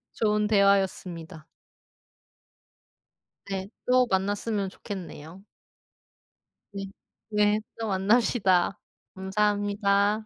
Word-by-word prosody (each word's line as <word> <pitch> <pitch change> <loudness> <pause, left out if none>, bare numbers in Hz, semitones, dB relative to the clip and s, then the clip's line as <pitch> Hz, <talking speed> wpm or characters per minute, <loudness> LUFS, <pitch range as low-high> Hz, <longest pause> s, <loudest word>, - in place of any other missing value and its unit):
좋은 210 -1 +1
대화였습니다. 190 -5 +1 2.0
네. 195 0 -4 0.2
또 250 0 +4
만났으면 200 +1 0
좋겠네요. 185 -1 -9 1.3
네. 195 -1 -5 0.5
네. 210 0 +3 0.2
또 225 - -2
만납시다. 195 -2 +2 0.4
감사합니다. 205 +1 +1
200 Hz, 175 characters per minute, -27 LUFS, 190-210 Hz, 2.0 s, 또